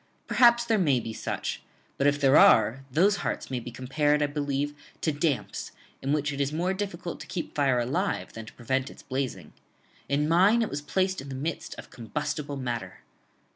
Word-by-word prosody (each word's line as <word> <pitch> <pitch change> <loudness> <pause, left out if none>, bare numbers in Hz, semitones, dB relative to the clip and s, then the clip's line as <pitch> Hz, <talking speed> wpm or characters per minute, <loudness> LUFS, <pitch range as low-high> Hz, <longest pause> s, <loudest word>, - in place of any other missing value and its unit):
Perhaps 235 -1 +5
there 225 -2 +2
may 145 -8 +3
be 115 -1 -6
such: - - -4 0.4
but, 140 - +4
if 145 0 +2
there 135 0 +5
are, 115 +4 +6
those 195 +8 +4
hearts - - -3
may 125 - -1
be 120 - -7
compared, 145 +5 +1
I - - +4
believe, 145 0 -2 0.3
to 160 - +1
damps, 145 -2 -2 0.3
in 135 - -1
which 150 0 0
it 140 - -2
is 140 0 0
more 175 +5 0
difficult 190 -3 -5
to 150 - -9
keep 170 0 -5
fire 135 -4 +2
alive 140 +12 -1
than 110 -1 -8
to - - -11
prevent 130 +2 -1
its - - -14
blazing: 130 -1 -4 0.6
in 145 +2 +1
mine 195 +8 +5
it - - -2
was 145 - -3
placed 185 +5 0
in 135 - -9
the 135 - -5
midst 150 +4 -4
of - - -11
combustible 145 +4 -4
matter. 120 -8 -4
145 Hz, 195 wpm, -27 LUFS, 130-165 Hz, 0.6 s, are